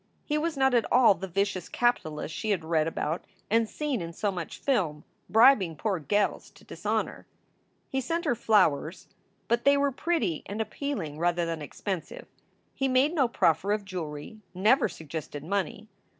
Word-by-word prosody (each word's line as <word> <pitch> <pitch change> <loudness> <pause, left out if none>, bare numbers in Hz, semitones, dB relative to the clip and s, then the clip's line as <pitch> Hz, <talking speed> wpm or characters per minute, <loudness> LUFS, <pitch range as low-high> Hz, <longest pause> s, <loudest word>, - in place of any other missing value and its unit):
He 300 - -1
was 310 0 -1
not 265 -1 +3
at 235 -2 +2
all 245 -4 +7
the 190 +1 -6
vicious 190 -1 -1
capitalist 160 -11 0
she 215 +7 -3
had 185 -6 0
read 160 -1 +1
about 165 0 -2 0.3
and 225 0 +3
seen 290 -8 -2
in 165 0 -6
so 205 +4 -1
much 175 -4 -6
film, 170 - 0 0.3
bribing 220 -7 +5
poor 195 0 -1
gels 205 +7 0
to - - -20
dishonor. - - -3 0.6
He 265 - -1
sent 335 +7 -2
her 290 - +3
flowers, 185 -8 +2 0.4
but 235 +1 +1
they 280 0 +5
were 280 0 +2
pretty 255 - -1
and 205 +2 -5
appealing 215 - -3
rather 175 0 +1
than 165 -1 -3
expensive. 180 +4 -5 0.5
He 270 - 0
made 265 +4 +3
no 280 -7 +3
proffer 195 -2 +2
of 210 -1 -2
jewelry, 170 +1 -6 0.2
never 210 +5 +4
suggested 155 -3 -7
money. 200 +3 -2
200 Hz, 165 wpm, -28 LUFS, 165-255 Hz, 0.6 s, all